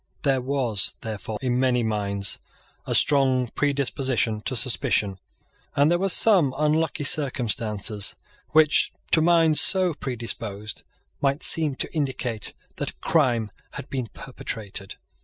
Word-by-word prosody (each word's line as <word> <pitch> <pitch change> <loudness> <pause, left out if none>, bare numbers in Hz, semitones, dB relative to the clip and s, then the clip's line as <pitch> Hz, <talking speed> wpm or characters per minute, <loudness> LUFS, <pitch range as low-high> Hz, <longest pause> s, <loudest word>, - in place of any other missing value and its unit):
There 135 -3 +1
was, 125 -6 0
therefore, 110 -1 -5
in 125 -1 0
many 125 -2 +1
minds, 100 -2 -2 0.5
a - - 0
strong 130 -4 +2
predisposition 135 -5 -1
to 130 - -1
suspicion; 105 -4 +1 0.6
and 145 +3 +3
there 175 - +2
were 195 +1 0
some 180 -8 +5
unlucky 150 0 0
circumstances 115 - 0 0.3
which, 155 -1 +3 0.2
to 160 - +5
minds 165 -2 +4
so 185 -3 +5
predisposed, 110 -6 -6 0.4
might 140 +1 0
seem 155 -4 +3
to - - -4
indicate 130 -7 -3 0.3
that - - -3
a - - -11
crime 120 -9 0 0.2
had 135 - -8
been 130 -4 -3
perpetrated. 105 -6 -6
130 Hz, 125 wpm, -24 LUFS, 110-150 Hz, 0.6 s, some